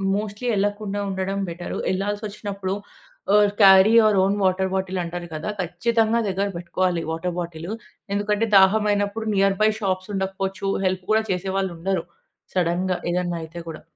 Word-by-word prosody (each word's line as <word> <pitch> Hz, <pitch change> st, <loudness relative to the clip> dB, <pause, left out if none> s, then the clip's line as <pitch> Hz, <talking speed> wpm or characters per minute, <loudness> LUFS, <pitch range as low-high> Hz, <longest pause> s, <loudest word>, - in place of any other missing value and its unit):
Mostly 210 Hz, +3 st, -4 dB
వెళ్లకుండా 205 Hz, 0 st, -1 dB
ఉండడం 190 Hz, +1 st, -2 dB
better, 175 Hz, +1 st, -5 dB
వెళ్లాల్సొచ్చినప్పుడు 200 Hz, 0 st, -3 dB, 0.6 s
ఆహ్, 205 Hz, -1 st, +5 dB
carry 195 Hz, +2 st, +8 dB
your 215 Hz, -2 st, +4 dB
own 200 Hz, +1 st, +2 dB
water 190 Hz, 0 st, +2 dB
bottle 190 Hz, -1 st, -1 dB
అంటారు 175 Hz, +1 st, -5 dB
కదా! 155 Hz, +6 st, -4 dB
ఖచ్చితంగా 230 Hz, +5 st, +1 dB
దగ్గర 195 Hz, +1 st, 0 dB
పెట్టుకోవాలి, 175 Hz, 0 st, -1 dB
వాటర్ 170 Hz, +2 st, -3 dB
బాటిలు, 170 Hz, +3 st, -5 dB, 0.4 s
ఎందుకంటే, 210 Hz, +2 st, +1 dB
దాహమైనప్పుడు 205 Hz, +2 st, +2 dB
నియర్‌బై 195 Hz, +2 st, +3 dB
షాప్స్ 185 Hz, 0 st, -1 dB
ఉండకపోవచ్చు, 195 Hz, 0 st, -2 dB, 0.2 s
హెల్ప్ 185 Hz, 0 st, 0 dB
కూడా 220 Hz, 0 st, +3 dB
చేసేవాళ్ళు 190 Hz, 0 st, -1 dB
ఉండరు. 185 Hz, 0 st, -1 dB, 0.5 s
సడెన్‌గా 180 Hz, +1 st, +1 dB
ఏదైనా 175 Hz, -1 st, -1 dB
అయితే 165 Hz, +2 st, -8 dB
కూడా. 155 Hz, -, -8 dB
195 Hz, 135 wpm, -23 LUFS, 180-205 Hz, 0.6 s, carry